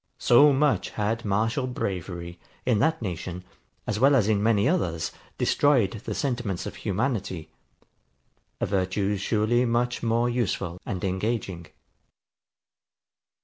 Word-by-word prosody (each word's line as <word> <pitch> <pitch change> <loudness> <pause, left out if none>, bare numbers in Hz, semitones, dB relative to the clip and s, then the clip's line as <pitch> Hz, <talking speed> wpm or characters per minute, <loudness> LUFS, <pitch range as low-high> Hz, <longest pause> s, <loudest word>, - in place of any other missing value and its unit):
So 145 +5 +6
much 140 +1 +2
had 110 +3 -2
martial 115 +6 0
bravery, 85 -6 -4 0.3
in 120 -5 +2
that 160 0 +1
nation, 90 -1 -5 0.4
as 105 - -2
well 140 +3 +5
as 110 -6 +3
in 105 -2 +2
many 105 0 +3
others, 85 - 0 0.3
destroyed 130 -10 +3
the - - -3
sentiments 120 -9 -2
of - - -6
humanity; 100 - -2 1.1
a - - 0
virtue 95 +1 0
surely 110 +4 +1
much 120 0 0
more 115 +1 +1
useful 100 -7 -2
and 95 0 -3
engaging. 95 -3 -2
105 Hz, 120 wpm, -26 LUFS, 95-120 Hz, 1.1 s, So